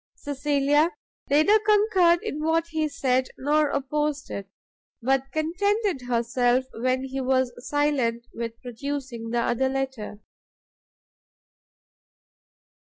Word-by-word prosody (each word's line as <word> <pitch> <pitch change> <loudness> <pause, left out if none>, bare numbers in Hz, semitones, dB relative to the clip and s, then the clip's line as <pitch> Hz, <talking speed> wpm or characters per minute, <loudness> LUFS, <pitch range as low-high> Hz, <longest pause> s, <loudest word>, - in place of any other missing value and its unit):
Cecilia 290 +2 +1 0.4
neither 310 +10 +5
concurred 415 -5 +3
in 305 +1 -4
what 325 +1 +1
he 315 -1 -1
said, 260 -2 +1
nor 295 +2 +2
opposed 290 +1 -2
it, 200 -1 -6 0.5
but 270 +2 0
contented 355 - 0
herself, 245 +1 +1
when 255 +2 0
he 265 0 -4
was 260 -1 +1 0.2
silent, 270 -6 +1
with 230 0 -5
producing 250 -2 -5
the 235 +1 0
other 240 +3 +1
letter. 265 -6 -3
270 Hz, 100 wpm, -25 LUFS, 250-305 Hz, 0.5 s, neither